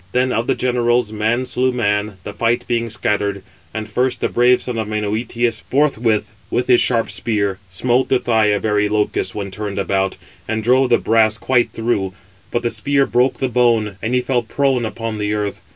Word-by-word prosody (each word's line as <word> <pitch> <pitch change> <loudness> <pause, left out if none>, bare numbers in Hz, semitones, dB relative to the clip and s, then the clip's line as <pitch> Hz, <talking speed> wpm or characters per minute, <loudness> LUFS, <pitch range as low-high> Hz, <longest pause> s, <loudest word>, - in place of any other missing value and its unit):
Then 125 +1 +2
of 115 +2 -1
the 135 - +2
generals, 120 -2 +1
man 110 +4 0
slew 130 +1 +1
man, 105 -4 -1
the 105 - -7
fight 115 +3 0
being 115 -1 0
scattered; 100 -2 -1 0.3
and 110 -1 -5
first, 125 +4 0
the - - 0
brave 125 +1 +4
son 120 -2 -4
of 110 - -2
Menœtius 110 +2 -1
forthwith 120 -6 +1 0.2
with 125 - 0
his 125 -2 +5
sharp 115 -2 +1
spear 100 -4 -1
smote 125 +7 +1
the 130 - +4
thigh 110 -3 +2
of 105 -2 +1
Areïlochus 105 -1 0
when 100 -2 -4
turned 105 0 -5
about, 95 0 0 0.3
and 110 0 -2
drove 130 +2 +3
the 120 - +5
brass 110 -1 +2
quite 120 +1 +1
through: 105 -5 -1 0.4
but 120 - -2
the 120 - 0
spear 140 -1 +1
broke 125 +2 +1
the 130 - 0
bone, 115 -5 +1
and 120 +3 -1
he 125 - +3
fell 125 -1 0
prone 130 +1 0
upon 110 -1 -4
the 105 0 -1
earth. 105 -1 -3
115 Hz, 190 wpm, -19 LUFS, 105-125 Hz, 0.4 s, his